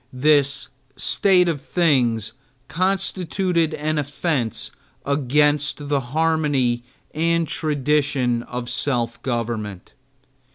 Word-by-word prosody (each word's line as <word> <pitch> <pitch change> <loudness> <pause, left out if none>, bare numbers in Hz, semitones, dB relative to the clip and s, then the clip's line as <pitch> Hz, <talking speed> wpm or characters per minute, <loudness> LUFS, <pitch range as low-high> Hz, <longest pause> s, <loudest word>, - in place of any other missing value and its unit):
This 140 +1 +2 0.3
state 180 +5 +3
of 155 -5 -1
things 120 - +1 0.3
constituted 180 -1 0
an 155 0 -1
offense 140 - -2 0.3
against 145 +1 +1
the 145 -1 +2
harmony 140 -3 0 0.3
and 165 +1 +1
traditions 140 -5 0
of 125 0 -5
self 120 -2 -1
government. 115 -6 -4
145 Hz, 85 wpm, -22 LUFS, 125-160 Hz, 0.3 s, state